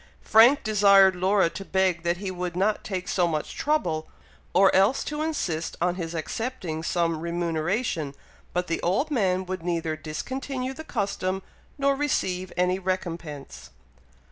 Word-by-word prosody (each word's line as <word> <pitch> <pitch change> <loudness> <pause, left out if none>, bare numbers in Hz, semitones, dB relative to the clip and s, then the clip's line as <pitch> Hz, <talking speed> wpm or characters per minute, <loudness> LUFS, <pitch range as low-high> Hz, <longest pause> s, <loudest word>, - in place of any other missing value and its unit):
Frank 240 +7 +6
desired 200 -3 +6
Laura 190 +1 +3
to 195 - -6
beg 190 -3 +1
that 170 0 0
he 190 0 -4
would 180 -1 -4
not 205 +3 +1
take 185 -3 -4
so 180 -2 +2
much 155 -2 -3
trouble, 175 - 0 0.4
or 190 +1 +5
else 195 +8 +3
to 300 0 -4
insist 175 - -2
on 175 +1 +1
his 170 -2 -5
accepting 175 -2 -3
some 165 -1 0
remuneration, 170 - -1 0.4
but 180 0 -1
the 165 -2 -2
old 235 - 0
man 190 -7 +1
would 185 -1 -4
neither 165 -2 -1
discontinue 260 - -4
the 315 - -8
custom, 195 -7 -2 0.3
nor 280 0 +2
receive 185 -11 -1
any 180 +1 +2
recompense. 170 -6 -5
185 Hz, 145 wpm, -26 LUFS, 170-215 Hz, 0.4 s, Frank